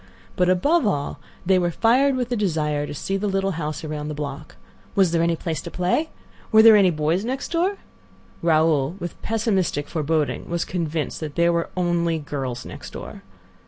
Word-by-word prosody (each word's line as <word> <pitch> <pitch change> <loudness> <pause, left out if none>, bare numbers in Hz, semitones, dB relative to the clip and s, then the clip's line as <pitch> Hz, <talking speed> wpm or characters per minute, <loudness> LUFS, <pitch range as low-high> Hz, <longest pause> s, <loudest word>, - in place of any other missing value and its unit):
But, 180 0 +2
above 265 - +3
all, 145 -8 -2 0.3
they 190 0 +4
were 175 -1 +1
fired 255 - +3
with 250 -1 -2
a - - +2
desire 155 -8 0
to - - -6
see 195 +6 -2
the 205 +2 -2
little 195 0 0
house 155 -3 -4
around 150 -1 -4
the 150 - -4
block. 145 +1 -6 0.4
Was 190 -4 +4
there 165 -1 +2
any 170 0 +2
place 160 -1 -3
to 170 - -7
play? 180 - 0 0.4
Were 220 0 +7
there 225 -1 +9
any 195 -3 +6
boys 160 +3 0
next 260 +4 -3
door? 360 +4 +1 0.6
Raoul, 160 -2 +2
with 175 -2 -7
pessimistic 200 - 0
foreboding, 155 -1 -1
was 170 0 -1
convinced 165 -3 -3
that 155 -2 -6
there 170 0 +3
were 170 0 -1
only 170 -2 +1
girls 135 -5 -5
next - - -9
door. - - -8
170 Hz, 185 wpm, -23 LUFS, 155-200 Hz, 0.6 s, there